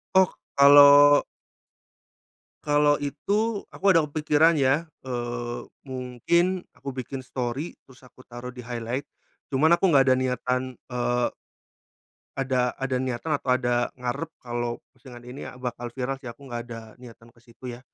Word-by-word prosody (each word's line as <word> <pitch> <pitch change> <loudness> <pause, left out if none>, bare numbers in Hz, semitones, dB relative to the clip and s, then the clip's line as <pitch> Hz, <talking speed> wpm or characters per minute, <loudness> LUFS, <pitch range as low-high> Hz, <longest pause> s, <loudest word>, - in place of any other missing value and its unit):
Oh, 190 0 +7 0.3
kalau 145 +1 +8 1.4
kalau 145 0 +3
itu 200 +10 -1
aku - - -9
ada 165 -5 +6
kepikiran 150 +2 +2
ya, 140 +4 +3 0.2
eee, 120 -1 -4 0.3
mungkin 150 +9 0
aku 140 - -7
bikin 130 +1 -6
story 130 +5 -4 0.2
terus 130 -1 -19
aku 130 - -19
taruh 120 +1 -8
di 125 - -13
highlight. 120 +2 -4 0.4
Cuman 145 +4 +2
aku 195 - +3
nggak 140 -6 +5
ada - - +5
niatan, 125 0 -2 0.2
eee 120 0 0 1.1
ada 130 -2 +1
ada 135 -1 -2
niatan 130 +4 -3
atau 130 - -7
ada 120 -1 0
ngarep 125 +6 -3
kalau 120 -1 -3 0.2
postingan 120 -3 -13
ini, 125 +3 -8
ah, - - -13
bakal 120 -1 -5
viral 135 +1 -3
sih 125 - -7
aku 140 +4 -12
nggak 120 -1 -4
ada 115 -1 -6 0.2
niatan 115 -1 -14
ke - - -22
situ 120 +1 -10
ya. 120 - -10
130 Hz, 145 wpm, -25 LUFS, 120-145 Hz, 1.4 s, kalau